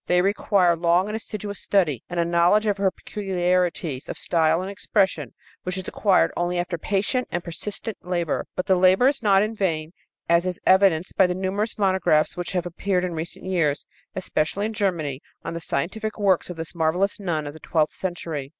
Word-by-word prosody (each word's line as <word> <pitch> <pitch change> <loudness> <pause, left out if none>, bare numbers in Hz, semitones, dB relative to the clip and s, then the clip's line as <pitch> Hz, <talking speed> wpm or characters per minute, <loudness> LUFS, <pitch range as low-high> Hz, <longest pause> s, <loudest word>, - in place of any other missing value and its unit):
They 180 0 +3
require 195 -3 +3
long 170 +2 +2
and 210 +1 -4
assiduous 210 -2 -6
study 165 - +1
and 175 - -3
a 170 - +2
knowledge 170 +5 +3
of 205 -2 0
her 195 -1 +3
peculiarities 180 -8 -1
of - - -5
style 160 -1 +2
and 195 - -5
expression 200 -1 0 0.3
which 185 +1 -4
is 185 - -5
acquired 200 -3 +3
only 175 +1 -1
after 175 -1 -2
patient 210 - 0
and 175 0 -2
persistent 205 +5 -5
labor. 175 -3 -2
But 185 - -2
the 190 - +3
labor 185 +7 +5
is 280 -1 +1
not 200 -3 +4
in 215 +1 -2
vain, 165 -7 -1 0.4
as 170 +2 +3
is 180 -1 -3
evidenced 185 -3 +3
by 190 - +6
the 180 - -2
numerous 195 +4 -2
monographs 190 -6 +2
which 175 +1 -4
have 180 -2 -1
appeared 180 +1 -1
in 180 - -3
recent 160 +1 -6
years, 165 -6 0 0.3
especially 190 +1 -1
in 220 - -3
Germany, 165 -10 -1 0.2
on - - -3
the 170 - -4
scientific 210 +10 -3
works 195 -5 +2
of 180 - -6
this 160 -1 -6
marvelous 175 +5 0
nun 165 -6 -2
of 145 - -6
the 160 - -12
twelfth 155 -2 0
century. 165 -6 -4
180 Hz, 195 wpm, -24 LUFS, 170-200 Hz, 0.4 s, by